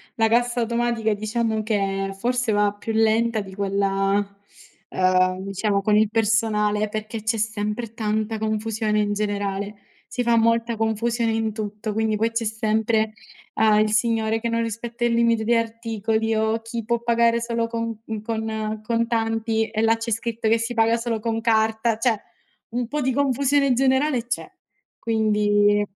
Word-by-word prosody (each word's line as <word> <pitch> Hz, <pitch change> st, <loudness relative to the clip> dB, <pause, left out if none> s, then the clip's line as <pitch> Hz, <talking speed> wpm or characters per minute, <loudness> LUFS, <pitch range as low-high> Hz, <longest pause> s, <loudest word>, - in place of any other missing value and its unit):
la 225 Hz, -1 st, +3 dB
cassa 240 Hz, +1 st, +1 dB
automatica 235 Hz, -1 st, 0 dB
diciamo 220 Hz, +1 st, -1 dB
che 195 Hz, -2 st, -1 dB
forse 245 Hz, +2 st, 0 dB
va 205 Hz, -1 st, +2 dB
più 210 Hz, +2 st, -5 dB
lenta 225 Hz, +1 st, +2 dB
di 190 Hz, -1 st, -10 dB
quella, 195 Hz, 0 st, +1 dB, 0.7 s
ehm, 185 Hz, 0 st, +2 dB
diciamo 200 Hz, +1 st, -1 dB
con 210 Hz, +1 st, +2 dB
il 215 Hz, 0 st, +4 dB
personale 215 Hz, -1 st, +1 dB
perché, 215 Hz, +1 st, -5 dB
c'è 225 Hz, +1 st, 0 dB
sempre 215 Hz, +1 st, -3 dB
tanta 220 Hz, 0 st, -1 dB
confusione 215 Hz, 0 st, -1 dB
in 205 Hz, -1 st, +1 dB
generale. 205 Hz, 0 st, -2 dB, 0.4 s
Si 245 Hz, -, -1 dB
fa 235 Hz, -1 st, +3 dB
molta 230 Hz, 0 st, +2 dB
confusione 225 Hz, +1 st, 0 dB
in 220 Hz, -1 st, -1 dB
tutto, 210 Hz, 0 st, -4 dB
quindi 220 Hz, 0 st, 0 dB
poi 225 Hz, +2 st, +1 dB
c'è 230 Hz, 0 st, -1 dB
sempre, 220 Hz, 0 st, 0 dB, 0.4 s
uhm, 215 Hz, -1 st, +4 dB
il 215 Hz, 0 st, +2 dB
signore 225 Hz, -1 st, +1 dB
che 235 Hz, -, -1 dB
non 230 Hz, 0 st, 0 dB
rispetta 230 Hz, +1 st, -3 dB
il 235 Hz, -, +2 dB
limite 230 Hz, -1 st, +2 dB
di 235 Hz, +2 st, +3 dB
articoli 225 Hz, -1 st, -1 dB
o 220 Hz, +1 st, +1 dB
chi 230 Hz, 0 st, -5 dB
può 235 Hz, +2 st, 0 dB
pagare 235 Hz, 0 st, +3 dB
solo 230 Hz, -1 st, -1 dB
con 230 Hz, 0 st, -3 dB, 0.2 s
uhm, 220 Hz, -1 st, -5 dB
con 220 Hz, 0 st, -3 dB
con 215 Hz, -1 st, -3 dB
contanti 225 Hz, -1 st, 0 dB
e 220 Hz, 0 st, -2 dB
là 225 Hz, 0 st, +4 dB
c'è 225 Hz, +1 st, -4 dB
scritto 225 Hz, 0 st, -1 dB
che 225 Hz, -, +4 dB
si 230 Hz, +2 st, -3 dB
paga 225 Hz, 0 st, +3 dB
solo 230 Hz, -1 st, -2 dB
con 225 Hz, 0 st, -1 dB
carta. 220 Hz, 0 st, +2 dB
Cioè, 225 Hz, -2 st, +1 dB, 0.5 s
un 240 Hz, 0 st, -2 dB
po' 300 Hz, -, -2 dB
di 260 Hz, -1 st, 0 dB
confusione 280 Hz, 0 st, +2 dB
generale 265 Hz, 0 st, +2 dB
c'è, 255 Hz, +9 st, -3 dB, 0.5 s
quindi 205 Hz, -2 st, +2 dB
225 Hz, 165 wpm, -23 LUFS, 215-230 Hz, 0.7 s, il